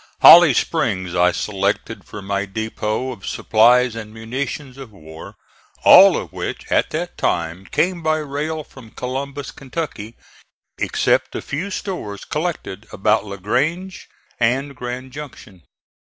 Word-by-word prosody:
Holly -, -, +9 dB
Springs 95 Hz, -2 st, -1 dB
I 90 Hz, 0 st, +4 dB
selected 100 Hz, +4 st, -2 dB
for 105 Hz, -, -9 dB
my 100 Hz, +1 st, -2 dB
depot 110 Hz, +4 st, -3 dB
of 100 Hz, -6 st, -10 dB
supplies 120 Hz, +2 st, +3 dB
and 110 Hz, -2 st, -7 dB
munitions 130 Hz, +4 st, -5 dB
of 130 Hz, -5 st, -10 dB
war, 80 Hz, -5 st, -12 dB, 0.5 s
all -, -, +9 dB
of -, -, -6 dB
which -, -, -5 dB
at -, -, +2 dB
that -, -, -5 dB
time 85 Hz, +3 st, -1 dB
came 180 Hz, 0 st, 0 dB
by 155 Hz, -1 st, +1 dB
rail 155 Hz, +1 st, -3 dB
from 130 Hz, -5 st, -15 dB
Columbus, 135 Hz, +3 st, -5 dB
Kentucky, 130 Hz, -6 st, -6 dB, 0.6 s
except -, -, +1 dB
the -, -, -4 dB
few 170 Hz, +8 st, -4 dB
stores 180 Hz, -, -5 dB
collected 150 Hz, -, -4 dB
about 105 Hz, +2 st, +1 dB
La 100 Hz, -, -6 dB
Grange 160 Hz, -, -2 dB, 0.3 s
and 135 Hz, +4 st, 0 dB
Grand 125 Hz, +1 st, -6 dB
Junction. 130 Hz, -10 st, -10 dB
120 Hz, 135 wpm, -20 LUFS, 100-140 Hz, 0.6 s, Holly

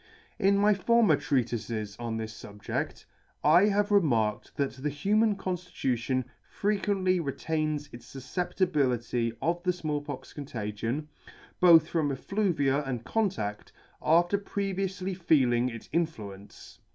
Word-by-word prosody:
In 200 Hz, +1 st, +4 dB
my 210 Hz, +1 st, +5 dB
former 230 Hz, +3 st, +4 dB
Treatifes 115 Hz, -5 st, -2 dB
on 115 Hz, -1 st, -3 dB
this 110 Hz, 0 st, -5 dB
fubjedt, 105 Hz, -1 st, -5 dB, 0.4 s
I 170 Hz, +6 st, +6 dB
have 205 Hz, 0 st, +1 dB
remarked 120 Hz, -, +1 dB
that 140 Hz, -1 st, -1 dB
the 150 Hz, -, 0 dB
human 205 Hz, +9 st, +2 dB
conftitution 135 Hz, -10 st, -2 dB, 0.2 s
frequently 195 Hz, -3 st, 0 dB
retains 155 Hz, 0 st, -2 dB
its 120 Hz, 0 st, -12 dB
fufceptibility 130 Hz, -, 0 dB
of 170 Hz, +1 st, 0 dB
the 180 Hz, -, +1 dB
Small 155 Hz, -5 st, -3 dB
pox 145 Hz, -2 st, -8 dB
contagion 120 Hz, 0 st, -4 dB, 0.5 s
(both 165 Hz, -3 st, +7 dB
from 155 Hz, -4 st, 0 dB
effluvia 150 Hz, -3 st, 0 dB
and 125 Hz, -4 st, -4 dB
contadt) 185 Hz, -, -2 dB, 0.3 s
after 175 Hz, +5 st, +3 dB
pre 200 Hz, -1 st, -3 dB
vioufly 190 Hz, 0 st, -3 dB
feeling 130 Hz, -8 st, +3 dB
its 115 Hz, -2 st, -9 dB
influence. 105 Hz, -, -4 dB
150 Hz, 120 wpm, -28 LUFS, 120-185 Hz, 0.5 s, both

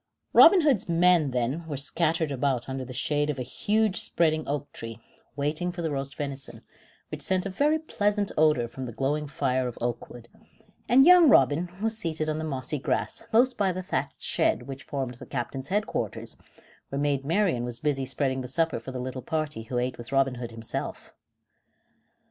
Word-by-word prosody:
Robin 380 Hz, -, +8 dB
Hood's 270 Hz, -, +2 dB
men, 170 Hz, -3 st, +4 dB
then, 125 Hz, +6 st, -1 dB
were 145 Hz, -3 st, -4 dB
scattered 160 Hz, +2 st, 0 dB
about 130 Hz, -2 st, -1 dB
under 130 Hz, 0 st, -4 dB
the 130 Hz, -, -9 dB
shade 145 Hz, +3 st, 0 dB
of 145 Hz, -, -2 dB
a 130 Hz, -, -3 dB
huge 210 Hz, -, 0 dB
spreading 155 Hz, -2 st, +1 dB
oak 145 Hz, 0 st, -3 dB
tree, 115 Hz, 0 st, -8 dB, 0.4 s
waiting 155 Hz, +5 st, -1 dB
for 175 Hz, -1 st, -6 dB
the 160 Hz, -, -1 dB
roast 140 Hz, 0 st, -4 dB
venison, 135 Hz, -5 st, -6 dB, 0.5 s
which -, -, -6 dB
sent 185 Hz, 0 st, 0 dB
a 195 Hz, -, -3 dB
very 295 Hz, +10 st, +2 dB
pleasant 205 Hz, -9 st, -1 dB
odor 150 Hz, -6 st, +3 dB
from 130 Hz, +2 st, -7 dB
the -, -, -6 dB
glowing 145 Hz, +5 st, -1 dB
fire 130 Hz, -3 st, 0 dB
of 120 Hz, -, -7 dB
oak 120 Hz, 0 st, -3 dB
wood, 120 Hz, -1 st, -12 dB, 0.6 s
and 260 Hz, +4 st, +7 dB
young 355 Hz, -3 st, +8 dB
Robin 145 Hz, -, +4 dB
was 225 Hz, 0 st, 0 dB
seated 155 Hz, -4 st, -2 dB
on 155 Hz, 0 st, -1 dB
the -, -, -3 dB
mossy 140 Hz, -1 st, -3 dB
grass -, -, -2 dB
close 250 Hz, +3 st, +4 dB
by 195 Hz, -2 st, +1 dB
the 185 Hz, +1 st, -5 dB
thatched -, -, -3 dB
shed -, -, +1 dB
which 135 Hz, 0 st, -8 dB
formed 135 Hz, -3 st, -3 dB
the 130 Hz, -, -9 dB
captain's 130 Hz, +1 st, -4 dB
headquarters, 210 Hz, +5 st, -2 dB, 0.5 s
where 135 Hz, -, -4 dB
Maid 140 Hz, -1 st, 0 dB
Marian 165 Hz, -, +1 dB
was 120 Hz, -1 st, -3 dB
busy 145 Hz, -3 st, 0 dB
spreading 130 Hz, 0 st, -1 dB
the 125 Hz, -, -6 dB
supper 160 Hz, +4 st, 0 dB
for 130 Hz, -, -8 dB
the 130 Hz, -, -5 dB
little 130 Hz, +1 st, -5 dB
party 155 Hz, -5 st, -3 dB
who 120 Hz, +3 st, -4 dB
ate 125 Hz, 0 st, -2 dB
with 120 Hz, -, -9 dB
Robin 135 Hz, -1 st, +2 dB
Hood 120 Hz, -, -4 dB
himself. 115 Hz, -1 st, -6 dB
145 Hz, 190 wpm, -27 LUFS, 130-175 Hz, 0.6 s, Robin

